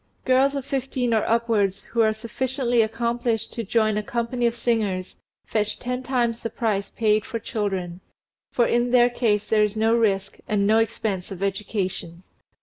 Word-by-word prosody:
Girls 265 +2 +3
of 275 -2 -3
fifteen 265 -3 -1
or 220 - +2
upwards 220 -4 +1
who 230 - -1
are 220 -1 +4
sufficiently 240 +2 0
accomplished 235 +1 -1
to 230 - -3
join 215 0 +1
a - - +1
company 235 +2 -1
of 230 - -1
singers 215 -6 -1 0.3
fetch 210 -1 -1
ten 250 +1 -3
times 240 -3 0
the 230 - -4
price 210 -3 -1
paid 215 -2 +1
for 230 - -4
children; 190 -5 -3 0.5
for 240 - +3
in 240 +1 +1
their 245 0 +5
case 215 -4 +1
there 215 -1 +3
is 210 0 0
no 220 +1 +2
risk 205 -4 +1
and 205 -1 +1
no 220 +2 +4
expense 215 -4 -2
of 195 0 -6
education. 190 -3 -3
225 Hz, 170 wpm, -24 LUFS, 205-240 Hz, 0.5 s, their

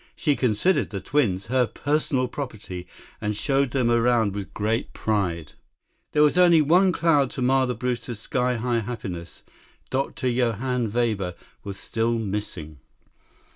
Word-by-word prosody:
She 145 -3 +1
considered 125 - +1
the 100 - -4
twins 100 -8 0
her 125 +1 +2
personal 145 -2 0
property 110 -9 -6 0.3
and 105 0 -1
showed 135 +4 +1
them 125 -2 +1
around 115 -3 +3
with 100 -1 -6
great 110 +3 -2
pride. 90 -8 -1 0.6
There 150 - +5
was 150 +4 +3
only 175 -2 +7
one 180 +6 +4
cloud 150 -6 +3
to - - -5
mar 130 +1 +3
the 125 - -2
Brewsters' 120 -1 -3
sky 125 +2 0
high 120 0 0
happiness. 95 -7 -6 0.5
Dr. 135 0 -1
Johann 120 -1 0
Weber 105 -6 0 0.3
was 100 -1 -6
still 115 +1 -1
missing. 95 -8 -4
120 Hz, 140 wpm, -24 LUFS, 105-135 Hz, 0.6 s, only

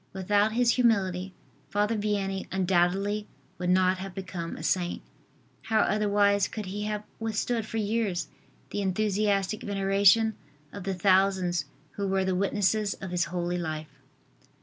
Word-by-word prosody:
Without 205 +3 +2
his 240 0 +3
humility, 195 -6 +2 0.4
Father 210 +2 +1
Vianney 200 -2 -1
undoubtedly 190 +3 +1 0.3
would 180 0 -1
not 185 0 +3
have 190 -1 -7
become 180 -3 -5
a - - -8
saint. 175 -2 0 0.6
How 220 -1 +3
otherwise 205 -1 +2
could 215 -2 -6
he 205 +3 -4
have 210 0 -3 0.2
withstood 225 +1 -1
for 225 - -4
years 210 -4 -1 0.4
the 205 - -2
enthusiastic 200 +1 0
veneration 200 +2 +3 0.4
of 200 -2 -7
the 195 -1 -1
thousands 185 -3 +2 0.3
who 200 -1 -1
were 190 0 +1
the 190 - +1
witnesses 200 +2 +1
of 190 -2 -7
his 180 -1 +1
holy 175 +1 -2
life. 155 -2 -5
195 Hz, 140 wpm, -28 LUFS, 185-210 Hz, 0.6 s, his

